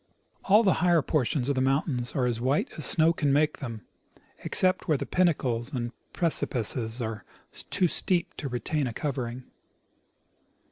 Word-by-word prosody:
All 210 +4 +5
the 190 - +4
higher 175 -4 +3
portions 135 -3 0
of 140 - +2
the 130 - -1
mountains 130 -2 0
are 125 -2 +1
white 125 +4 -1
as 155 - 0
snow 165 +3 +5
can 145 -4 0
make 150 +2 +1
them, 115 -6 -7 0.5
except 185 0 +1
where 155 -4 +2
the - - -4
pinnacles 130 -10 0
and 120 -2 -3 0.2
precipices 120 - 0
are 110 -3 -4 0.5
too 185 -3 +2
steep 175 +1 0
to 140 - -4
retain 135 +3 -2
a 120 - -5
covering. 125 -3 -4
135 Hz, 150 wpm, -27 LUFS, 120-160 Hz, 0.5 s, All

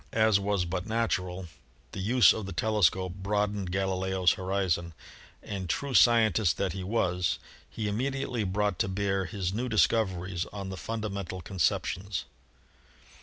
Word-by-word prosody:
As 110 -2 +4
was 100 -2 0
but 90 +3 -3
natural, 95 -5 -1 0.5
the - - -6
use 115 +4 +5
of 110 -3 -5
the - - -5
telescope 95 -3 +2
broadened 100 -1 -1
Gali 95 0 0
leo's 95 -1 +3
horizon, 90 -3 -1 0.5
and, 95 -3 -5
true 140 +8 -2
scientist 110 -7 +4
that 95 -3 -1
he 95 -1 -5
was, 90 -4 0 0.3
he 110 - -4
imme 115 +7 0
diately 125 -7 -2
brought 105 -1 0
to - - +2
bear 95 0 -1
his 95 -2 -3
new 125 +4 -2
discoveries 95 -5 +1
on 100 -2 -7
the 95 - -5
funda 110 +4 -3
mental 95 -2 -5
conceptions. 95 +2 -1
100 Hz, 150 wpm, -29 LUFS, 95-110 Hz, 0.5 s, use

